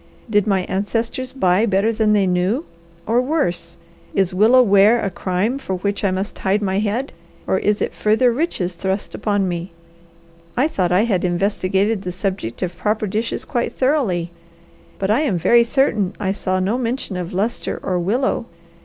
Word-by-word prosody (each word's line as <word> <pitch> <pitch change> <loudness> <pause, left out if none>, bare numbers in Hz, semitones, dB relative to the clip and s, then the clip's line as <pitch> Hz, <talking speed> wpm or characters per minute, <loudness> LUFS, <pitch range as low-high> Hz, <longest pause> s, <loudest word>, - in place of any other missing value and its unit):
Did 205 -2 +2
my 195 -2 +2
ancestors 225 +7 -2
buy 195 -3 +2
better 205 +3 +2
than 215 -1 +2
they 205 -2 +3
knew, 185 - 0 0.4
or 235 +3 +2
worse? 175 - -1 0.4
Is 190 -1 +1
willow 225 +7 +6
ware 205 +2 +5
a 200 -3 -2
crime 190 +9 -1
for 190 -8 -3
which 200 +3 -2
I 200 - +3
must 190 +2 -3
hide 195 +2 +1
my 195 -1 0
head, 220 +6 -2 0.3
or 190 - +1
is 210 0 +1
it - - -3
further 225 +4 +2
riches 230 - -1
thrust 190 +3 -3
upon 205 -2 0
me? 175 0 -4 0.8
I 265 +5 +3
thought 185 - -1
I 185 +4 +4
had 200 -6 0
investigated 195 +3 0
the 180 - -4
subject 185 - -3
of 180 -1 -3
proper 215 +4 -1
dishes 215 +3 -2
quite 240 -5 -2
thoroughly; 230 - 0 0.7
but 195 +1 0
I 235 +7 +3
am 230 - +1
very 235 +8 +5
certain 230 -6 +1
I 195 -3 0
saw 185 -2 -1
no 205 +7 0
mention 240 -4 -2
of 180 -1 -4
lustre 205 +6 -2
or 180 -1 0
willow. 235 +6 0
200 Hz, 175 wpm, -20 LUFS, 185-230 Hz, 0.8 s, willow